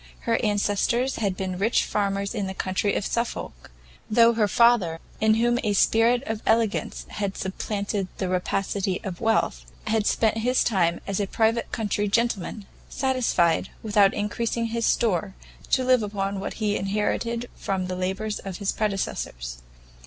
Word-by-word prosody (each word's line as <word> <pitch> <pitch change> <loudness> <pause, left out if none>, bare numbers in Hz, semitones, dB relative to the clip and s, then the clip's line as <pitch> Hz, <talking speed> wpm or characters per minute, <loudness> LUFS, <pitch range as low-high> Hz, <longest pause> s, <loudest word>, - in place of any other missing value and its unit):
Her 230 0 0
ancestors 210 +5 +1
had 195 -4 -1
been 185 -1 -3
rich 220 +4 +2
farmers 200 0 -1
in 205 -4 -2
the 190 - -5
county 190 +2 0
of 200 - -1
Suffolk, 235 0 -3 0.4
though 230 +1 +5
her 220 -2 +2
father, 205 -7 +3 0.2
in 220 0 +4
whom 240 +2 +2
a 210 -2 +1
spirit 230 +5 +3
of 220 -1 -3
elegance 225 -2 +1
had 200 -2 -3
supplanted 200 +1 -3
the 190 - -2
rapacity 185 +1 -1
of 185 -3 -6
wealth, 225 0 +1 0.2
had 215 -1 +1
spent 225 0 +2
his 250 +3 +2
time 175 -6 +1
as 200 0 -2
a 200 - 0
private 225 +3 +1
country 210 -1 -1
gentleman, 210 -2 -1 0.2
satisfied, 255 -11 +1
without 205 -2 +4
increasing 230 +3 -1
his 230 0 0
store, 190 -4 +1 0.3
to 260 - +3
live 255 -1 +4
upon 200 -1 -2
what 195 - -5
he 210 -2 0
inherited 215 +4 -1
from 190 -2 -2
the 185 0 -3
labours 190 +4 -2
of 190 -2 -6
his 200 -1 -1
predecessors. - - -3
210 Hz, 155 wpm, -25 LUFS, 195-230 Hz, 0.4 s, though